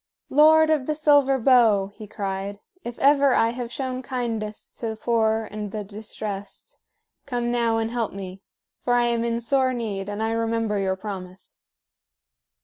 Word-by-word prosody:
"Lord 315 +2 +6
of 295 -4 +1
the 305 - 0
Silver 290 -3 +4
Bow," 225 -6 +4
he 215 0 -10
cried, 200 -1 -4 0.2
"if 240 0 -6
ever 280 -1 +4
I 225 - +3
have 240 0 -5
shown 255 -1 -3
kindness 230 -5 -4
to 230 - -3
the 220 - -3
poor 220 -1 +1
and 210 -1 -5
the 215 0 -4
distressed, 205 -1 -7 0.5
come 240 -2 -1
now 235 -2 +1
and 225 0 -1
help 235 -3 -1
me. 190 -1 -8 0.4
For 245 - +2
I 240 0 +3
am 235 -1 0
in 235 0 -1
sore 260 +2 +1
need, 205 -4 -4
and 205 +1 -3
I 225 - 0
remember 225 -2 0
your 190 -1 0
promise." 190 -2 -8
225 Hz, 165 wpm, -24 LUFS, 210-250 Hz, 0.5 s, Lord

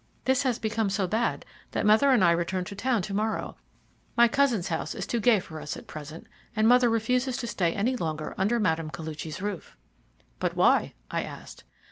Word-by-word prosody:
This 265 0 +3
has 255 -4 0
become 220 -1 -1
so 195 0 0
bad 220 +5 -1 0.3
that - - 0
mother 220 +7 +5
and 250 -7 +5
I 170 - +6
return 175 +2 0
to 200 +3 -8
town 235 -1 0
to 200 - -5
morrow; 215 +2 -2 0.6
my 235 0 +7
cousin's 245 -7 +1
house 160 -1 -3
is - - -4
too 235 - -1
gay 225 -1 +4
for 160 -3 -9
us - - -5
at - - -11
present, 155 +1 -9 0.3
and 215 +1 +3
mother 245 0 +6
refuses 250 +3 0
to 245 - -4
stay 180 -7 0
any 235 +6 +1
longer 155 -7 -3
under 215 +5 +1
Mme. 165 -7 0
Koluchy's 160 +1 -6
roof." 205 -5 -5 0.6
"But - - -1
why?" - - +3 0.2
I - - 0
asked. - - -10
210 Hz, 195 wpm, -27 LUFS, 170-235 Hz, 0.6 s, my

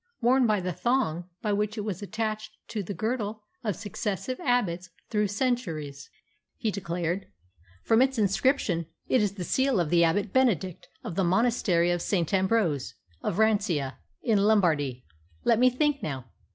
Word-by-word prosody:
"Worn 250 +1 +4
by 210 -2 +2
the 180 -1 -2
thong 185 -7 0
by 210 -2 +1
which 210 +2 -1
it - - -1
was 205 -4 -4
attached 215 +1 -4
to 215 - -2
the 195 +1 -5
girdle 220 -2 -2 0.2
of 210 -5 -1
successive 210 +3 -4
abbots 185 -8 0 0.2
through 210 -1 +2
centuries," 185 - -2 0.5
he 225 -4 -1
declared. 175 0 -2 0.6
"From 225 +1 +4
its 265 0 +2
inscription, 200 - +1 0.2
it 255 - +3
is 205 -2 +1
the 190 -3 -5
seal 260 +3 +2
of 165 -4 0
the 170 -1 +5
Abbot 190 +5 +1
Benedict 200 - +1 0.2
of - - -5
the 190 +3 +1
Monastery 180 -3 +2
of 175 -1 0
St. 175 -2 0
Ambrose, 190 - +1 0.3
of - - -2
Rancia, 200 -11 +1 0.2
in 220 -5 +3
Lombardy. 160 - +2 0.4
Let 230 -1 +3
me 255 +1 +6
think, 290 +3 +1
now. 135 -5 -4
205 Hz, 160 wpm, -27 LUFS, 175-230 Hz, 0.6 s, me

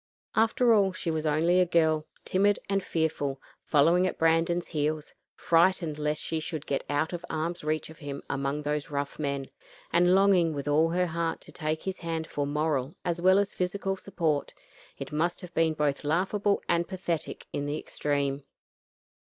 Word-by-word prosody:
After 225 +2 +4
all 195 -3 +3
she 170 -2 -2
was 160 0 -1
only 165 +4 +3
a 180 - +5
girl, 160 -2 +2 0.2
timid 200 +2 +3
and 195 -1 0
fearful, 145 -4 -1 0.2
following 165 +5 +4
at - - -4
Brandon's 165 +2 +2
heels; 155 0 -2 0.2
frightened 165 -2 +2
lest 150 0 -1
she 160 - -1
should 155 -1 -5
get 135 - -1
out 150 +4 0
of 175 - -4
arm's 165 +2 -3
reach 155 +1 -1
of 160 - -15
him 140 -2 -6
among 140 +2 -2
those 150 0 -2
rough 140 0 -3
men, 140 -2 -2 0.4
and 180 +1 +5
longing 190 -5 +4
with 140 0 -4
all 155 +3 +3
her 180 +2 +1
heart 165 -1 -2
to - - -11
take 155 -1 -3
his 190 -1 -4
hand 165 -1 -3
for 145 -2 -3
moral 150 -2 -1
as 170 -1 -1
well 185 +2 +6
as 200 0 +1
physical 195 +1 -1
support. 170 -7 -2 0.4
It - - -7
must 165 +5 0
have 180 -2 -10
been 165 -1 +2
both 145 -2 0
laughable 190 +6 +1
and 170 0 +1
pathetic 180 -4 -4
in 145 - -2
the 145 +1 -2
extreme. 140 -1 -1
160 Hz, 180 wpm, -28 LUFS, 150-180 Hz, 0.4 s, well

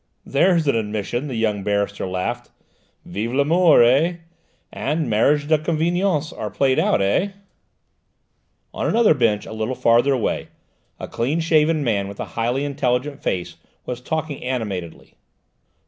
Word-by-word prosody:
"There's 170 +2 +2
an 140 - +3
admission!" 110 +4 -2
the 130 - -5
young 110 -3 0
barrister 100 0 -1
laughed. 90 0 -3 0.6
"Vive 115 +4 -4
l'amour, 155 +1 +5
eh? 140 +9 +3 0.6
And 150 +1 -2
mariages 145 +7 +2
de 155 -1 +3
convenance 165 0 0
are 105 - -5
played 130 +6 +1
out, 100 - +2
eh?" 185 - +1 1.4
On - - -2
another 230 -6 +4
bench 115 -7 +1
a - - -8
little 110 +4 -3
further 120 +4 +3
away, 125 -4 -1 0.5
a - - -6
clean 135 +8 -1
shaven 160 -1 +2
man 100 -6 0
with 100 0 -10
a - - -3
highly 120 +5 -1
intelligent 140 0 -1
face 90 -2 -3 0.3
was 125 -1 -5
talking 155 +1 -4
animatedly. 105 -10 -5
130 Hz, 140 wpm, -21 LUFS, 110-155 Hz, 1.4 s, l'amour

